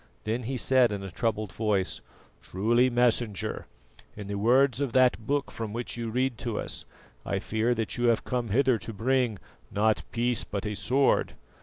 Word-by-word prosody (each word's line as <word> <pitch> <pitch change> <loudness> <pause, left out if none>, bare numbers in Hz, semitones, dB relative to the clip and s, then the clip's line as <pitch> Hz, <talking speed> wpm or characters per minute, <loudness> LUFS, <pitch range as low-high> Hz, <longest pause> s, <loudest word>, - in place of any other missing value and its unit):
Then 115 +3 -1
he 130 +2 -2
said 125 -2 +4
in 100 -1 -4
a 95 - -7
troubled 110 0 -2
voice: 100 -2 -1 0.4
"Truly, 120 +7 +2
Messenger, 120 -5 0 0.5
in 105 - -6
the 100 - -5
words 125 +6 +3
of 135 -5 -1
that 125 -4 +3
Book 145 0 0
from 110 -2 -5
which 120 +1 -3
you 115 -1 -4
read 125 0 -1
to 115 -4 -3
us, - - -4 0.4
I 100 - -2
fear 110 +4 0
that 115 0 -2
you 120 - +1
have 115 -1 +3
come 125 -2 -2
hither 130 +1 +3
to 115 - -6
bring, 120 0 +1 0.3
'not 105 +2 +1
peace 120 0 +1
but 100 0 -5
a 105 - -2
sword. 135 +6 +2
115 Hz, 180 wpm, -28 LUFS, 105-125 Hz, 0.5 s, said